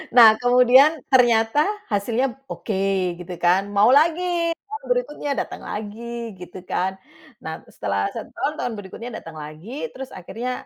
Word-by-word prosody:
Nah, 230 -3 +10
kemudian, 250 +5 +5
ternyata 240 +3 +4 0.2
hasilnya 235 +5 0 0.2
oke, 195 -3 -1
gitu 180 0 -7
kan. 185 +4 +2
Mau 205 +5 +5
lagi, 335 +3 +2
tahun 435 +3 -8
berikutnya, - - -1
datang - - -4
lagi, 230 +2 -6
gitu 180 0 -11
kan. 190 +1 -1 0.5
Nah, - - -6
terus, - - -22
setelah - - -1
1 - - -7
tahun, 300 - -1
tahun 245 - -2
berikutnya 205 +5 -8
datang 165 -1 -10
lagi, 155 - -7
terus 265 0 -7
akhirnya, 235 +7 -5
235 Hz, 145 wpm, -22 LUFS, 195-270 Hz, 0.5 s, Nah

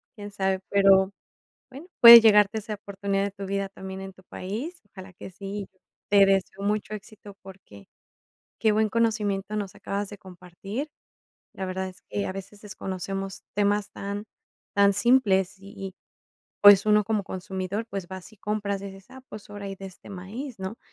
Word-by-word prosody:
quién 205 -1 -8
sabe. 190 -2 -1
Pero 195 -1 +5 0.6
bueno, 285 +7 -11
puede 235 0 +13
llegarte 210 -1 +5
esa 215 0 -6
oportunidad 200 0 -3
de 200 - -2
tu 195 0 -8
vida 195 0 -1
también 190 0 -8
en 195 0 -8
tu 185 - -19
país, 230 - -6
ojalá 190 -1 -11
que 185 - -10
sí. 195 +1 -6 0.4
Te 200 -1 +7
deseo 195 0 0
mucho 210 +1 -1
éxito 210 -1 -10
porque, 185 - -14 0.7
qué 220 -2 +3
buen 215 0 +2
conocimiento 215 -3 0
nos 205 -3 -4
acabas 200 0 -4
de 205 - -9
compartir, 190 - -7 0.6
la 190 - -5
verdad 190 0 -3
es 185 - -14
que 200 - -2
a - - -3
veces 195 +2 -9
desconocemos 195 -1 -5
temas 205 0 +1
tan 200 +1 -5 0.5
tan 200 0 +5
simples. 195 -5 +3
Y 195 +1 -13
y, 195 -1 -7 0.7
pues, 205 0 +9
uno 210 0 +4
como 210 -2 -1
consumidor, 190 +3 -4
pues, 195 -3 -5
vas 190 +2 -9
y 215 - -19
compras, 205 -1 -2
y 200 - -7
dices: 195 0 -11
"Ah, 265 0 -12
pues 210 -1 -11
ahora 205 -1 -7
hay 195 - -5
de 195 - -10
este 185 - -14
maíz, 215 +7 -7
¿no?" 190 +4 -6
200 Hz, 175 wpm, -26 LUFS, 190-210 Hz, 0.7 s, puede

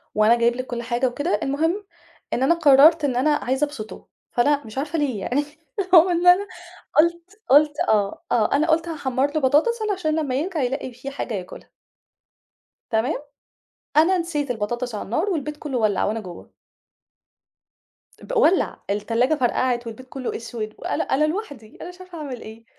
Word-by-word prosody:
وأنا 215 +2 +5
جايب 235 0 +2
لِك 255 +1 -5
كل 240 -1 -4
حاجة 240 +2 0
وكده. 290 +8 -1
المهم 325 +9 -1 0.5
إن 255 - 0
أنا 335 +6 +4
قررت 305 0 +6
إن 260 -3 -1
أنا 255 +5 +2
عايزة 265 +1 0
أبسطه، 255 -7 -9 0.2
فلأ 285 +4 +2
مش 220 +3 -11
عارفة 300 +4 -2
ليه 265 -8 -1
يعني 275 +9 -1 0.5
هو 340 +2 +8
إن 350 0 +1
أنا 370 +3 +6 0.5
قلت 340 +6 +1
قلت 295 +2 +4
آه، 205 -2 +1
آه 220 -3 +2
أنا 305 +3 +1
قلت 325 +2 +2
هاحمَر 280 -3 -1
له 310 - +1
بطاطس 300 - +3
علشان 320 -6 -1
لمّا 280 -5 -2
يرجع 320 +4 -2
يلاقي 260 0 -3
في 250 +3 -8
حاجة 265 -4 -5
ياكلها. 185 -3 -8 1.2
تمام؟ 235 +6 0 0.8
أنا 350 +5 +5
نسيت 300 -6 -2
البطاطس 240 +2 -3
على 205 - -5
النار 315 - -1
والبيت 300 -4 -3
كله 290 -4 -4
ولّع 215 -4 +1
وأنا 220 +2 -1
جوه. 180 -5 -11 1.7
ب - - -3
ولّع 365 -2 +2
التلاجة 230 +8 +1
فرقعت 245 -2 0
والبيت 230 +3 -9
كله 260 -2 -5
أسود 225 -2 -6
وأنا - - -2
أنا 280 +3 +1
لوحدي 300 - -5
أنا 345 - -7
مش 360 0 -13
عارفة 365 -2 -11
أعمل 275 -6 -6
إيه. 225 +1 -11
275 Hz, 170 wpm, -23 LUFS, 240-320 Hz, 1.7 s, هو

